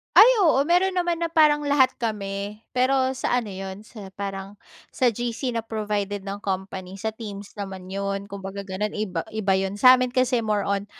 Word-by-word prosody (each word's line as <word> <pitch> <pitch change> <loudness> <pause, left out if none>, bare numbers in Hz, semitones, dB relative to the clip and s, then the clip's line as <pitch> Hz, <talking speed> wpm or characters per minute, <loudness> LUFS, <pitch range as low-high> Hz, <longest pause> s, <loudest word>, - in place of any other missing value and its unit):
Ay, 470 - +10 0.2
oo 300 -4 +4
meron 355 +5 +2
naman 350 -2 0
na 335 - -1
parang 305 -3 +4
lahat 285 -2 +4
kami, 205 -2 -4
pero 260 +1 +1
sa 245 -2 +1
ano 215 - -8
yun, 190 +1 -7
sa 210 -3 -11
parang, 195 0 -5 0.4
sa 255 - +3
GC 240 +3 -3
na 225 - -3
provided 210 -2 -2
ng 200 +1 -5
company, 190 -2 -4
sa 220 - 0
teams 205 -3 -8
naman 190 -2 -6
yun, 200 +1 -3
kung 200 - -6
baga 195 +1 -5
gano'n 200 +2 -3
iba 185 -6 -3
iba 205 -3 +1
yun, 190 0 -1
sa'min 255 +3 +5
kasi 250 -3 +2
more 210 -2 0
on 200 0 0
210 Hz, 185 wpm, -24 LUFS, 195-255 Hz, 0.4 s, Ay